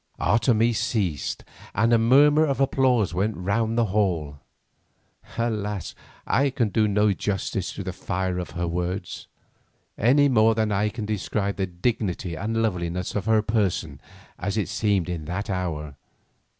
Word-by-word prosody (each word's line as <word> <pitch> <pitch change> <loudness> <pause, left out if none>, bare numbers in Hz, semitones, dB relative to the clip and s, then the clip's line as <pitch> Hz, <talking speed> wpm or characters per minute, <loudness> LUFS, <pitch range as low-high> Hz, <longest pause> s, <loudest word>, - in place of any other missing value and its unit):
Otomie 120 -1 +3
ceased 105 - -1 0.3
and 115 +4 +3
a 115 - +5
murmur 145 +6 +5
of 140 -3 0
applause 130 -7 +2
went 100 +4 -1
round 110 +5 0
the 120 - +3
hall. 85 -9 0 1.0
Alas, 105 -5 -2 0.3
I 140 +3 +2
can 125 -4 0
do 110 +1 +2
no 105 0 +3
justice 95 -1 -2
to 100 - -6
the 95 -1 -4
fire 95 0 -2
of 90 -3 -5
her 85 0 -1
words, 90 +2 -4 0.7
any 140 +6 +5
more 115 -4 +4
than 110 -1 0
I 105 +1 +1
can 110 0 -5
describe 105 -1 -2
the 95 -1 -1
dignity 90 -1 -2
and 110 +7 -1
loveliness 90 -3 -2
of 105 - -2
her 110 -1 +3
person 95 - -1 0.4
as 100 +3 -2
it 105 - -1
seemed 100 -5 0
in 85 -4 -4
that 100 +6 -3
hour. 80 -6 -3
105 Hz, 150 wpm, -24 LUFS, 90-115 Hz, 1.0 s, a